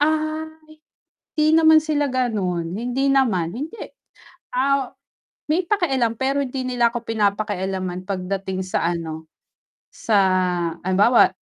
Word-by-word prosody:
Ay, 310 +1 0 0.9
hindi 305 - +3
naman 315 -1 +7
sila 295 -3 0
gano'n, 190 -10 -1
hindi 245 +6 -1
naman, 205 -11 +1
hindi. 300 - -6 0.8
Ah, 275 0 +1 0.6
may 345 +3 +1
pakialam, 270 - +1
pero 265 +4 -1
hindi 260 0 -4
nila 245 -2 +1
ako 240 - -3
pinapakialaman 195 -4 -2
pagdating 190 0 -3
sa 185 -2 -1
ano, 160 -1 -6 0.7
sa 215 -2 0 0.6
halimbawa, 200 +6 +4
235 Hz, 110 wpm, -22 LUFS, 190-275 Hz, 0.9 s, naman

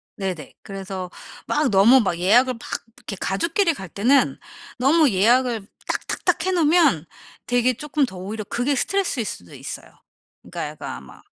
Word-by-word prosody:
네네. 185 -7 -5
그래서 190 -2 -6 0.4
막 300 -2 +1
너무 215 +7 +6
막 185 -6 0
예약을 245 +8 +4
막 230 - -13 0.4
이렇게 200 - -7
가족끼리 335 - +1
갈 190 -9 -8
때는 250 +10 +2 0.4
너무 285 +4 +4
예약을 235 +3 +3 0.3
딱 - - -3
딱 - - -4
딱 - - +2
해 375 - +1
놓으면 315 - +3 0.4
되게 245 +1 +2
조금 295 +2 -1
더 190 -6 -10
오히려 210 +4 -5
그게 245 +7 0
스트레스일 355 - 0
수도 90 - -7
있어요. - - -7 0.6
그러니까 - - -5
약간 - - -8
아마 65 0 -14
240 Hz, 335 characters per minute, -22 LUFS, 195-285 Hz, 0.6 s, 너무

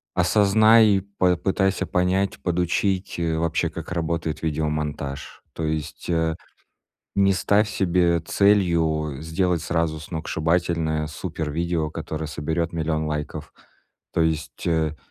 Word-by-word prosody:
осознай 110 +4 +5
и 100 -2 +4
попытайся 95 0 0
понять, 95 +2 0
подучить, 90 +2 0
э, 80 -1 0
вообще, 85 +1 0
как 80 0 -8
работает 80 -2 -2
видеомонтаж. 75 -3 -3
То 80 - -5
есть, 75 +1 -4
э, 80 -1 +1 0.8
не 100 -1 +4
ставь 100 +3 +2
себе 85 -3 +2
целью 80 -6 +2
сделать 85 +1 0
сразу 80 -2 -1
сногсшибательное 80 0 -1
супервидео, 80 0 -2
которое 80 -1 -5
соберёт 80 +3 -2
1000000 80 -1 -1
лайков, 75 0 -4 0.6
то 85 - +2
есть, 80 +1 -2
э, 80 -2 +1
85 Hz, 110 wpm, -23 LUFS, 80-90 Hz, 0.8 s, осознай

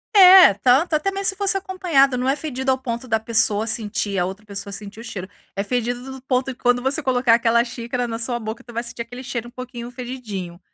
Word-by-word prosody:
É, 370 - +9
tanto, 265 - +3
até 350 +6 0
mesmo 390 0 -4
se 390 - -1
fosse 395 0 +1
acompanhada, 345 -9 +2
não 255 +1 -1
é 270 - +2
fedido 265 -3 -2
ao 260 - +1
ponto 240 -1 -5
da 220 -1 +1
pessoa 220 -1 +1
sentir 205 -3 -2
a 180 - +1
outra 195 +3 -7
pessoa 200 -1 -6
sentir 210 +1 -8
o - - -8
cheiro, 195 -5 -7 0.3
é 200 - -1
fedido 245 +3 -3
do 265 -1 -9
ponto 255 -1 0
que 260 -1 -6
quando 245 0 +2
você 275 +3 0
colocar 250 -2 +3
aquela 235 0 +3
xícara 240 0 -4
na 225 0 -4
sua 240 +1 -2
boca 220 +1 -6
tu 240 - -13
vai 235 - -1
sentir 235 0 -5
aquele 245 +2 -10
cheiro 240 -2 -5
um - - -19
pouquinho 245 -1 -8
fedidinho, 220 -9 -7
245 Hz, 235 wpm, -21 LUFS, 225-265 Hz, 0.3 s, É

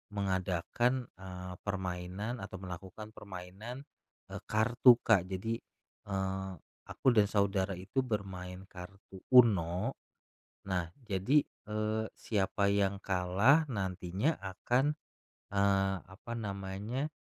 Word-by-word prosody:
mengadakan, 100 +6 0
eee, 90 -1 -7
permainan 95 +4 -3
atau 95 0 -7
melakukan 95 +4 -8
permainan, 100 +7 -8 0.5
eee, - - -5
kartu, 120 +3 +6
Kak. 90 -2 +4
Jadi, 110 +5 -2 0.5
eee, 95 0 -2 0.4
aku - - -4
dan 105 -3 +5
saudara 100 -2 +1
itu 95 +9 -3
bermain 95 -4 -4
kartu 95 +1 -11 0.2
Uno. 100 -1 +5 0.6
Nah, 90 -3 -1 0.2
jadi, 110 +8 +3 0.2
eee, 110 +1 -1
siapa 100 -1 +1
yang 100 -1 +1
kalah, 100 - +4
nantinya 95 - -1
akan, 120 +9 0 0.6
eee, 95 -1 +3
apa 95 +5 -10
namanya, 100 +7 -3
100 Hz, 100 wpm, -33 LUFS, 95-110 Hz, 0.6 s, kartu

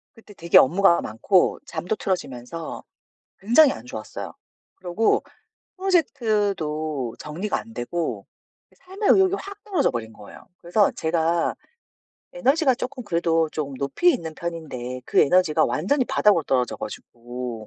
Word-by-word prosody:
그때 220 -2 -16
되게 170 -2 +3
업무가 175 +4 +5
많고 175 - +1
잠도 195 +5 -3
틀어지면서 165 -3 -4 0.6
굉장히 255 +8 +5
안 - - -11
좋았어요. 250 - -7 0.4
그러고 190 +4 0 0.5
프로젝트도 200 - 0
정리가 170 +8 -3
안되고 175 - -4 0.4
그 - - -28
삶의 390 +3 -3
의욕이 385 -1 +4
확 400 +1 -10
떨어져 380 -9 +1
버린 115 -2 -5
거예요. 105 -2 -14
그래서 195 +4 +2
제가 165 +1 0 0.8
에너지가 270 +2 +2
쪼끔 255 0 -6
그래도 165 -3 +1
조금 145 -3 -4
높이 140 - +2
있는 160 - -5
편인데 130 -7 -6
그 - - +3
에너지가 180 0 +3
완전히 255 - 0
바닥으로 195 -7 +3
떨어져 125 -3 0
가지고 120 -2 -7
170 Hz, 320 characters per minute, -23 LUFS, 150-230 Hz, 0.8 s, 업무가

